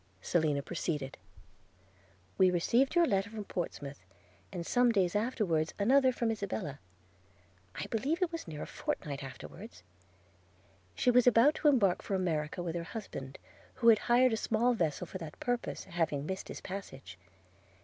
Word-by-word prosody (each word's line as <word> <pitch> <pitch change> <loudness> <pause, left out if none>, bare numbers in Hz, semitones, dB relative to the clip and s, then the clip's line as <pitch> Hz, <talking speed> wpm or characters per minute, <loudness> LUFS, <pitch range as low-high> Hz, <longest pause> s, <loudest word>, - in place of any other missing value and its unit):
Selina 150 - +1
proceeded. 150 -4 -3 1.2
'We 185 -1 +6
received 235 - +2
your 345 -1 +6
letter 195 -6 0
from 220 -2 -6
Portsmouth, 145 - -5 0.5
and 175 -3 -5
some 245 +3 +3
days 190 -5 +1
afterwards 205 -8 0
another 260 +5 +4
from 235 -2 0
Isabella 195 -8 -4 0.5
– 90 +1 -33
I - - -2
believe 275 +9 -1
it 345 - 0
was 330 - -6
near 150 -2 -6
a - - -5
fortnight 140 -1 -4
afterwards 90 -8 -10 0.6
– 90 +1 -33
She 250 - +3
was 250 0 +5
about 245 +5 +6
to - - +3
embark 210 -11 +4
for 195 - -2
America 165 -2 -1
with 170 -2 -3
her 170 - -2
husband, 160 -8 -7 0.4
who 235 -2 +4
had 220 -2 +7
hired 245 0 +5
a - - +1
small 230 +3 +2
vessel 165 -10 -1
for 190 - -7
that 160 -3 -9
purpose, 245 -1 -2
having 165 -5 -1
missed 190 +3 -4
his - - -7
passage. 135 - -8
185 Hz, 160 wpm, -32 LUFS, 150-230 Hz, 1.2 s, had